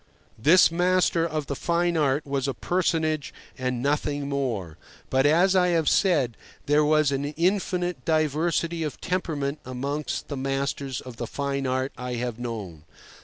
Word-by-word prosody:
This 165 +9 +6
master 175 -1 +2
of 155 -2 -3
the 140 - -4
fine 170 +3 0
art 145 -2 +1
was 140 -1 -1
a 135 - -2
personage 160 -4 0 0.2
and 125 -1 -2
nothing 145 0 0
more; 120 - -3 0.3
but, 135 +2 +4
as 180 +5 +4
I 180 -1 +4
have 160 -2 0
said, 145 - +3 0.3
there 145 +1 +4
was 155 -1 +3
an 135 0 -1
infinite 175 -1 -1
diversity 165 +2 0
of 150 -3 -3
temperament 155 -6 -2
amongst 140 +4 -3
the 145 - -5
masters 135 -1 -2
of 125 -3 -10
the - - -4
fine 140 -1 -2
art 130 +1 -1
I 125 0 -3
have 120 -1 -3
known. 105 -10 -5
145 Hz, 155 wpm, -25 LUFS, 130-165 Hz, 0.3 s, This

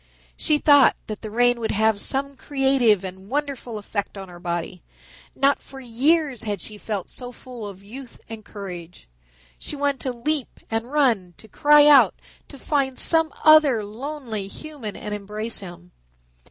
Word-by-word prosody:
She 305 - +1
thought 285 -2 +6
that 215 -2 -6
the 215 - -6
rain 245 +2 +2
would 225 - -2
have 215 0 +2
some 275 +1 -2
creative 265 -7 +2
and 190 +1 -8
wonderful 275 -4 -3
effect 205 -1 -4
on 195 -1 -8
her 175 -1 -12
body. 175 +1 -4 0.5
Not 275 +1 +2
for 270 - -12
years 265 +2 +1
had 205 -3 -3
she 210 +3 -7
felt 205 -4 -4
so 245 -1 -8
full 245 -3 -9
of 195 -1 -11
youth 250 +5 -11
and 225 -1 -8
courage. 180 - -9 0.5
She - - -4
wanted 285 -1 0
to 260 - -2
leap 275 +3 -3
and 225 +3 -2
run, 230 - +2
to 220 - -15
cry 295 +5 +5
out, 295 -2 +7 0.3
to 280 - -12
find 270 -2 -1
some 325 -1 +3
other 305 -8 +6
lonely 230 -2 -5
human 265 -3 -7
and 210 - -6
embrace 210 +2 -3
him. 175 -2 -11
235 Hz, 165 wpm, -23 LUFS, 205-280 Hz, 0.5 s, out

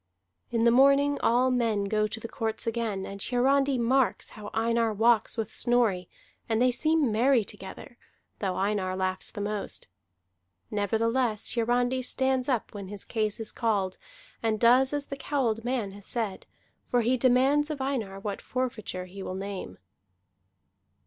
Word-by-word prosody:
In 230 -1 0
the 235 - +6
morning 280 +3 +4
all 250 +2 +3
men 230 -5 +1
go 215 +1 +1
to 215 +1 -6
the 230 - -6
courts 220 -1 -3
again; 225 -4 -2
and 200 0 -6
Hiarandi 270 +3 +2
marks 250 +1 +1
how 210 -2 -9
Einar 230 0 +1
walks 230 +2 +2
with 220 -1 -2
Snorri, 230 -8 +1 0.4
and 225 -1 +1
they 250 +1 +4
seem 310 0 +2
merry 240 +2 +3
together, 200 +6 -9 0.4
though 190 -3 -1
Einar 195 -1 0
laughs 185 0 -2
the 205 - -7
most. 205 0 -4 0.8
Nevertheless, 225 +2 0
Hiarandi 245 +2 +1
stands 260 +1 0
up 245 -5 -1
when 200 -2 -7
his 200 0 -4
case 215 -1 -1
is 225 - 0
called, 205 -5 -1 0.4
and 220 -2 0
does 250 +3 +5
as 290 -1 -2
the 275 - -6
cowled 250 -6 -1
man 240 -5 -1
had 200 +1 -12
said, 220 -3 -3 0.4
for 245 - +3
he 240 +3 +2
demands 265 +4 +3
of 300 -2 -4
Einar 240 -8 -2
what 200 0 -4
forfeiture 230 -8 -3
he 190 +2 -10
will 185 - -5
name. 195 - -6
230 Hz, 155 wpm, -28 LUFS, 205-255 Hz, 0.8 s, the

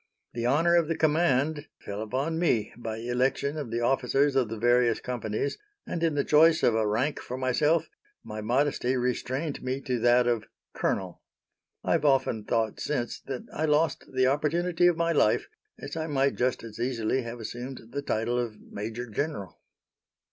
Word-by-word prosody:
The 120 0 -1
honor 165 +6 +4
of 170 -2 +3
the 165 - -1
command 155 -1 +2
fell 100 +1 -6
upon 135 +9 -2
me 120 -11 +1
by 115 -2 -5
election 125 +5 0
of 145 -6 -4
the 115 +1 -2
officers 135 +3 +2
of 130 -5 +2
the 115 - -4
various 120 +1 +3
companies, 120 +1 -3 0.3
and 170 - -4
in 165 -3 +1
the 140 - +2
choice 160 +2 +5
of 120 - +5
a 110 -1 +1
rank 125 +8 0
for 125 - -6
myself 150 +6 +2 0.4
my 110 0 -6
modesty 130 +2 +1
restrained 130 +4 -2
me 130 +1 -2
to 125 -3 -2
that 120 +1 +4
of 120 -3 0 0.3
colonel. 95 -2 -2 0.6
I - - -1
have - - +2
often 130 -6 +2
thought 110 -2 0
since 125 -5 -2
that 130 -2 -4
I 155 - 0
lost 155 +1 +1
the 130 0 +2
opportunity 165 +6 +2
of 175 -2 +3
my 170 0 +1
life, 125 -9 +3 0.3
as - - -7
I 160 0 -2
might 140 -2 +2
just 125 -1 0
as 115 -1 -9
easily 120 0 0
have 120 0 -7
assumed 120 +1 -7
the 140 - -3
title 120 -2 -1
of 115 -3 -4
major 110 +4 -6
general. 115 -3 -4
130 Hz, 175 wpm, -28 LUFS, 115-150 Hz, 0.6 s, choice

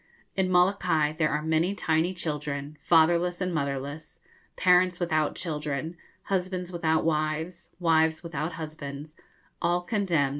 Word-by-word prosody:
In 190 -1 +1
Molokai 180 -4 +3
there 155 -1 +1
are 150 +1 -1
many 160 +5 +1
tiny 165 +1 +1
children, 150 -3 -4
fatherless 175 +2 +3
and 180 -1 -1
motherless, 145 +2 -3 0.4
parents 180 0 +4
without 155 -4 +1
children, 155 0 -3 0.3
husbands 185 -1 -2
without 160 -2 +1
wives, 160 +2 -1
wives 160 -1 +2
without 165 0 -3
husbands, 155 -2 -7 0.5
'all 175 +1 +2
condemned.' 175 - +1
160 Hz, 120 wpm, -27 LUFS, 155-180 Hz, 0.5 s, parents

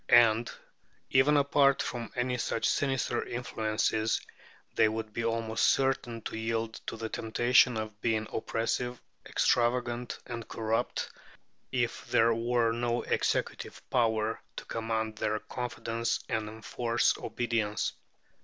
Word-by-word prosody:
And, 115 -1 +6 0.6
even 140 +3 +5
apart 140 -1 +4
from 120 -2 -4
any 125 0 0
such 115 - 0
sinister 135 -3 0
influences, 110 -2 0 0.5
they 110 - +4
would 110 -1 -4
be 115 - -2
almost 115 -1 0
certain 130 -4 +1
to - - -5
yield 115 0 -1
to - - -4
the 110 - -3
temptation 120 +2 +3
of 110 -1 -5
being 110 -2 +1
oppressive, 120 +2 -1 0.3
extravagant, 120 0 +1
and 115 -2 -6
corrupt, 115 0 -1 0.6
if 120 -2 -1
there 115 +1 +4
were 115 0 +1
no 120 +1 0
executive - - -1
power 110 -2 +1
to - - -7
command 110 -1 -2
their 110 0 0
confidence 115 -1 -2
and 110 -1 -1
enforce 115 +2 0
obedience. 115 -3 -1
115 Hz, 120 wpm, -30 LUFS, 110-120 Hz, 0.6 s, And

